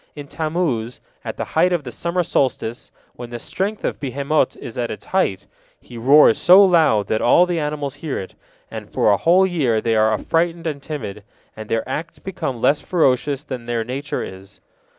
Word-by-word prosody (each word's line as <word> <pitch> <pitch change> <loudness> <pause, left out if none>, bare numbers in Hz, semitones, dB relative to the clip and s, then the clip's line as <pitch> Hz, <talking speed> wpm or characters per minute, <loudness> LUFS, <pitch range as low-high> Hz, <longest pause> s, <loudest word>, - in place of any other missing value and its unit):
In 145 -1 -8
Tammuz, 155 -8 -2 0.2
at - - -6
the - - -3
time 180 - +2
of 175 -4 0
the 125 - -7
summer 170 +5 -1
solstice, 130 -7 -2 0.2
when 120 -1 -9
the 120 - -6
strength 200 - -3
of - - -2
behemot 140 +1 -1
is 115 - -9
at 120 -1 -2
its - - -7
height, 100 - 0 0.3
he 120 - -14
roars 130 +2 +5
so 190 +3 +7
loud 160 - +3
that 110 - -1
all 175 +9 +5
the 175 -2 -2
animals 150 -2 -3
hear 155 -4 -3
it, 95 - -7 0.4
and - - -8
for 105 - +2
a 100 - +3
whole 180 - +4
year 140 -12 +1
they 115 +1 0
are 110 0 +3
affrighted 165 +9 -1
and 150 -3 -3
timid, 110 -9 -6 0.3
and 110 0 -9
their 115 +1 -1
acts 160 +5 -5
become 175 -10 -5
less 145 +5 +2
ferocious 145 -4 +1
than 130 -5 -7
their 120 -1 -1
nature 135 +5 -4
is. 95 +1 -11
140 Hz, 190 wpm, -20 LUFS, 115-165 Hz, 0.4 s, so